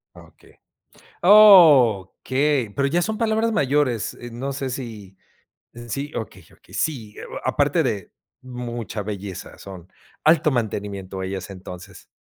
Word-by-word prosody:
Okey. - - -18 0.7
Okey. 145 - +5
Pero 140 0 0
ya 175 +5 +1
son 215 +4 -2
palabras 225 0 +1
mayores, 140 - 0
eh, 120 - -8
no 135 +4 -5
sé 135 -1 -4
si 110 -7 -8 0.7
sí, 140 +6 -4
okey, 110 - -6
okey, - - -21
sí, 115 -9 -3
eh, - - -8
o - - -8
aparte - - +1
de - - -3 0.3
mucha 120 -4 -6
belleza, 100 -2 -7
son 95 -2 -12 0.3
alto 155 -1 +4
mantenimiento 100 -5 -4
ellas 95 +1 -5
entonces. 90 -1 -11
125 Hz, 130 wpm, -22 LUFS, 100-150 Hz, 0.7 s, Okey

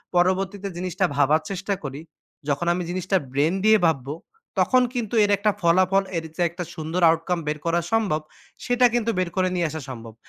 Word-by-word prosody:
পরবর্তীতে 190 +2 +1
জিনিসটা 180 -1 -1
ভাবার 145 +3 +3
চেষ্টা 195 +1 -2
করি 140 +2 -6 0.5
যখন 145 +5 0
আমি 180 - -2
জিনিসটা 185 +2 0
brain 150 +6 +1
দিয়ে 220 0 +7
ভাববো। 140 -2 -2 0.4
তখন 255 -1 +4
কিন্তু 235 -3 -3
এর 205 - +2
একটা 210 +1 +2
ফলাফল 185 +3 +3
এর 165 - -2
যে, - - -3
একটা 175 +2 -6
সুন্দর 160 +2 -3
outcome 165 +1 0
বের 150 0 -1
করা 170 +1 +2
সম্ভব 205 -9 +1 0.4
সেটা 245 0 +3
কিন্তু 230 -1 +1
বের 180 -2 0
করে 185 -1 +2
নিয়ে 175 -2 +1
আসা 155 0 -6
সম্ভব। 115 -3 -8
180 Hz, 180 wpm, -24 LUFS, 160-195 Hz, 0.5 s, দিয়ে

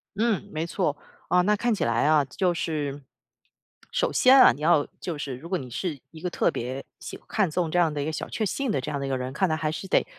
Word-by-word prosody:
嗯， 220 -1 0
没 155 +1 -2
错， 170 -4 -1 0.3
啊， 180 - +4
那 210 +4 +3
看 235 +3 0
起 210 - -1
来 115 +2 +1
啊， 155 -1 +5
就 175 +7 0
是。 145 -4 -3 0.9
首 - - +1
先 260 +1 +6
啊， - - +9
你 135 +5 -8
要 155 -2 +4
就 170 -4 -4
是 140 -3 -4
如 155 +6 -10
果 185 - +1
你 130 -6 -8
是 155 +4 -3
一 160 - -11
个 180 - -2
特 - - +1
别 130 +3 -5
喜 - - -8
看 210 -5 +1
重 165 0 -1
这 175 - +2
样 165 -3 +3
的 145 - -2
一 - - -2
个 160 - -2
小 155 - -4
确 220 - -2
幸 270 +7 -2
的 135 - 0
这 150 - -4
样 140 - -2
的 140 - -3
一 - - -3
个 135 - 0
人， 130 0 -4
看 190 +6 +1
来 155 - +1
还 155 -1 -1
是 180 +5 -6
得， - - +2
155 Hz, 290 characters per minute, -26 LUFS, 140-185 Hz, 0.9 s, 啊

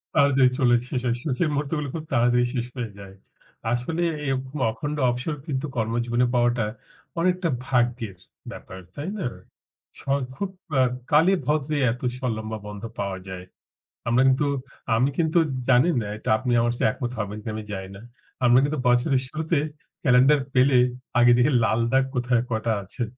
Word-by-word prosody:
তাড়াতাড়ি 140 -3 +5
চলে, 120 -2 +5
শেষ 125 - -2
হয়। 120 - +1
সুখের 155 +2 0
মুহুর্তগুলো 145 +1 -2
খুব 160 - -4
তাড়াতাড়ি 120 0 +3
শেষ 120 -3 -1
হয়ে 115 -3 -3
যায়। 95 -1 -11 0.6
আসলে 160 +8 -1 0.2
এরকম 135 +1 -3
অখণ্ড 145 +6 -4
অবসর 125 +6 -2
কিন্তু 135 -2 -2
কর্মজীবনে 120 +1 0
পাওয়াটা 120 -1 +2 0.5
অনেকটা 180 0 +1 0.2
ভাগ্যের 120 -5 0 0.3
ব্যাপার, 95 - -10 0.2
তাই 150 +5 -4
না? 190 - -3 0.7
স - - -9
অ্যা 135 - +3 0.2
খুব 200 +7 -3 0.3
আ - - +6 0.3
কালে 160 +6 +5
ভদ্রে 150 0 0
এত 125 - -6 0.2
স - - -12 0.2
লম্বা 110 0 -5
বন্ধ 105 0 -8 0.2
পাওয়া 100 -2 -2
যায়। 90 -1 -7 0.6
আমরা 120 +2 +3
কিন্তু 135 +2 +3 0.5
আমি 125 +4 +3
কিন্তু 165 0 +3 0.3
জানি 130 +6 +5
না 105 - -4
এটা 110 - -5
আপনি 125 +2 -2
আমার 120 0 +1
চেয়ে - - +3
একমত 120 +1 -4
হবেন 105 0 -3
কি - - -22
না - - -1
আমি 110 - -5
জানি 95 -1 -5
না। 100 - -11 0.4
আমরা 120 +1 +6
কিন্তু 145 +1 -1
বছরের 125 +2 +3
শুরুতে 155 +3 -1 0.4
ক্যালেন্ডার 130 +3 +5
পেলে 130 0 +5 0.4
আগে 120 0 +6
দেখি 125 +5 +3
লাল 110 +1 +1
দাগ 135 0 +3
কোথায় 120 -1 +2
কটা 110 +1 0
আছে। 100 +6 -4
125 Hz, 170 wpm, -24 LUFS, 115-145 Hz, 0.7 s, আ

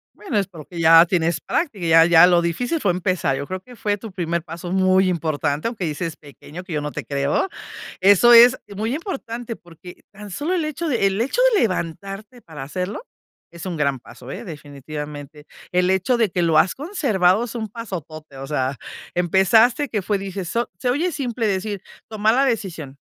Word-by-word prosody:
Bueno, 375 - -3
es 195 - +1
porque 170 -1 -10
ya 165 +1 +7
tienes 170 -2 0
práctica, 220 - -2
ya 165 0 +6
ya 175 0 +7
lo 175 -1 +4
difícil 245 - -1
fue 195 - +2
empezar, 175 -6 -1
yo 140 - -5
creo 185 0 -5
que 245 +5 -15
fue 205 -1 -1
tu 220 +1 -9
primer 170 -2 -2
paso 170 +2 -7
muy 185 0 +3
importante, 155 -1 -1
aunque 230 -6 -4
dices 160 +1 -4
pequeño, 150 +4 -11
que 180 -2 -8
yo 150 - -1
no 150 - -4
te - - -6
creo, 140 - 0 0.5
eso 200 +5 +6
es 240 +2 +8 0.2
muy 220 +5 -2
importante 245 - -5
porque 175 +1 -15
tan 210 0 -11
solo 295 - -2
el 340 -3 0
hecho 305 +2 -3
de 235 -8 +1
el 195 +2 0
hecho 275 - 0
de 415 - +4
levantarte 195 +5 -4
para 155 -8 -10
hacerlo 180 - -4 0.5
es 170 +2 -10
un 180 -3 -3
gran 140 -3 0
paso, 125 +1 -13
eh, 215 +10 -7
definitivamente. 150 - -8 0.3
El 180 +1 +2
hecho 190 +7 +2
de 225 -4 +1
que 175 - -1
lo 165 -2 +2
has 180 +3 +4
conservado 235 - +1
es 240 - -8
un 220 -2 -4
pasotote, 160 - -8
o 135 - -6
sea, 135 -2 -2 0.4
empezaste 220 - +3
que 215 - -1
fue 205 +1 0
dices, 195 -2 -5
so 235 +5 -2
se 250 - -2
oye 300 +9 +1
simple 245 -6 -2
decir, 200 0 -2 0.3
toma 215 0 +1
la 270 +3 +3
decisión. 175 - -3
185 Hz, 195 wpm, -21 LUFS, 165-230 Hz, 0.5 s, es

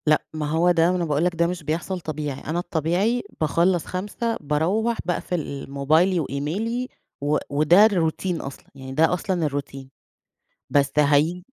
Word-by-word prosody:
لأ، 155 0 +4
ما 150 -1 -3
هو 165 +3 +3
ده 165 0 +3
ما 180 - +1
أنا 175 - -1
باقول 150 +1 +1
لك 180 -1 0
ده 170 +1 +2
مش 180 -2 -4
بيحصل 165 +5 -2
طبيعي، 150 -4 -4
أنا 160 +4 -2
الطبيعي 180 +8 0 0.2
باخلص 170 +3 +2
17:00 210 +5 -3
باروح 180 +11 0
باقفل 165 -6 -3
موبايلي 160 +7 +2
وإيميلي 180 - -2 0.3
و 145 +1 +1
وده 155 +8 +5
الروتين 175 -3 0
أصلًا 135 0 -9
يعني 130 -1 -9
ده 160 +4 +3
أصلًا 180 -2 -1
الروتين، 140 -2 -5 0.8
بس 140 -1 +2
هاي 150 +5 +3
165 Hz, 155 wpm, -23 LUFS, 150-180 Hz, 0.8 s, وده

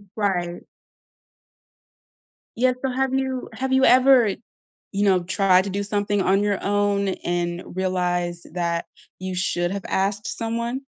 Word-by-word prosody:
Right. 180 -5 -1 1.9
Yes, 255 +2 +2
so 265 - 0
have 265 +1 0
you 265 -1 -2
have 265 0 -2
you 265 - +4
ever, 255 -2 +6 0.6
you 200 +1 0
know, 185 -3 +3
tried 190 0 +3
to 200 - -3
do 200 +2 -2
something 205 0 0
on 195 +2 +2
your 205 -2 -1
own 200 -1 +1 0.2
and 175 0 -1
realized 175 -2 -2
that 170 -1 -1 0.3
you 185 0 -4
should 175 -1 0
have 200 0 -4
asked 200 +2 -1
someone? 235 +3 -2
200 Hz, 135 wpm, -23 LUFS, 180-230 Hz, 1.9 s, ever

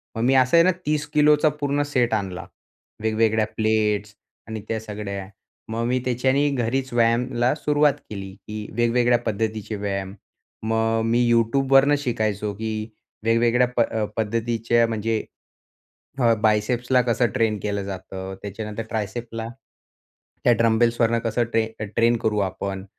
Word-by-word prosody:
मग 115 - -2
मी 130 +2 +3
असं 130 +5 +4
आहे 165 - +7
ना 185 - +5
30 150 0 0
किलोचा 150 +1 +5
पूर्ण 145 0 +1
सेट 120 -3 +2
आणला. 95 -4 -2 0.6
वेगवेगळ्या 110 0 +2
प्लेट्स 105 -1 0 0.3
आणि 110 -1 -5
त्या 110 -1 -1
सगळ्या. 100 -3 -6 0.4
मग 115 +1 -2
मी 125 +1 +1
त्याच्याने 130 +4 +2
घरीच 130 +1 -1
व्यायामाला 120 +2 +2
सुरुवात 150 -1 +2 0.2
केली. 95 -2 -7
की 105 0 -8
वेगवेगळ्या 120 +1 +3
पद्धतीचे 110 0 -2
व्यायाम. 100 -1 -3 0.5
मग 115 0 +1
अ, - - 0
मी 120 +2 +2 0.4
YouTubeवरणं 135 +2 +5
शिकायचो, 110 -5 -1
की 110 +1 -4 0.3
वेगवेगळ्या 120 +2 +3
प - - +5 0.4
पद्धतीचे 115 +1 +1
म्हणजे 110 0 -1 1.0
अ, 115 -2 +4
बायसेप्सला 120 +4 +2
कसं 120 0 +1
ट्रेन 110 -2 +1
केलं 100 -1 -2
जातं 95 0 -6
त्याच्यानंतर 105 +2 -5
ट्रायसेप्सला, 115 +2 -4 1.0
त्या 120 - +6
डंबेलवरून 115 0 +3
कसं 115 +1 0
अ, 110 -1 -1
ट्रेन 115 +1 +4
करू 105 -1 +1
आपण. 95 0 -5
115 Hz, 135 wpm, -23 LUFS, 105-120 Hz, 1.0 s, आहे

